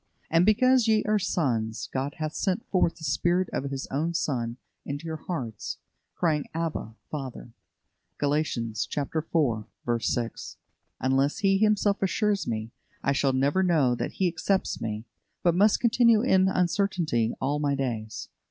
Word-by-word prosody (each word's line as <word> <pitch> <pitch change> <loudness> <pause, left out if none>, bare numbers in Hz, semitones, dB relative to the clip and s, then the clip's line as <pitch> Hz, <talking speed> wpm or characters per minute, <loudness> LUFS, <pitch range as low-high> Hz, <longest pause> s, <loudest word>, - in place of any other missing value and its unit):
"And 165 +3 +4
because 255 +2 +4
ye 215 -1 +3
are 210 0 +2
sons, 120 - -1
God 135 +2 -2
hath 155 -1 -3
sent 195 +2 -1
forth 180 -3 +2
the 160 - -14
Spirit 175 +6 +1
of 140 - -2
His 135 -1 -4 0.3
Son 125 -8 -1 0.3
into 145 +3 -5
your 160 -1 -3
hearts, 125 - -5 0.4
crying, 155 -4 0
Abba, 160 -9 -3 0.2
Father" 130 -5 -6 0.7
(Gal. 145 0 +1
iv. 155 +1 +2
6). 115 -2 -3 2.1
Unless 135 +2 +2
He 195 -2 +3
Himself 210 -1 +2
assures 200 +1 +1
me, 110 0 -3 0.3
I 140 - +2
shall 135 -1 +2
never 140 +8 +2
know 160 -9 +3
that 120 - -3
He 190 - +1
accepts 185 +3 -1
me, 110 0 -3 0.4
but 175 - +4
must 205 +4 +4
continue 230 -1 +4
in 190 -7 +4
uncertainty 175 - +1
all 145 +3 0
my 145 -1 +1
days. 115 -5 -3
160 Hz, 145 wpm, -27 LUFS, 130-190 Hz, 2.1 s, And